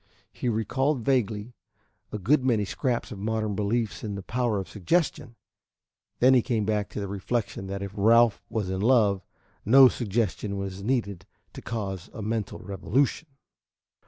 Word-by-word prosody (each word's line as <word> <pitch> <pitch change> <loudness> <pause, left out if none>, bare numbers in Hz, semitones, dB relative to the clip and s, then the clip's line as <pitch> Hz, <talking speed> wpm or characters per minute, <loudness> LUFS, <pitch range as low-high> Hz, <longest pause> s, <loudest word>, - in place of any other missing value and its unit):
He 125 - -2
recalled 130 +5 0
vaguely 115 -3 0 0.6
a - - -3
good 130 +8 +2
many 115 -5 +2
scraps 120 +6 -2
of 100 - -7
modern 110 0 -1
beliefs 105 +2 -1
in 105 -2 -4
the 100 - -6
power 120 -1 -1
of 95 - -4
suggestion; 120 - -1 0.8
then 130 +2 +5
he 125 - +5
came 115 -3 -1
back 105 -1 -1
to - - -6
the 100 - -3
reflection 100 0 -3
that 100 0 -4
if 100 - -5
Ralph 115 +2 +4
was 105 -4 -2
in 95 0 -2
love, 105 -5 +3 0.4
no 130 +4 +8
suggestion 105 -3 -2
was 100 0 -5
needed 100 -5 -2 0.3
to - - -9
cause 100 -4 -5
a 110 - -5
mental 110 -1 -2
revolution. 125 - -1
110 Hz, 160 wpm, -26 LUFS, 100-120 Hz, 0.8 s, no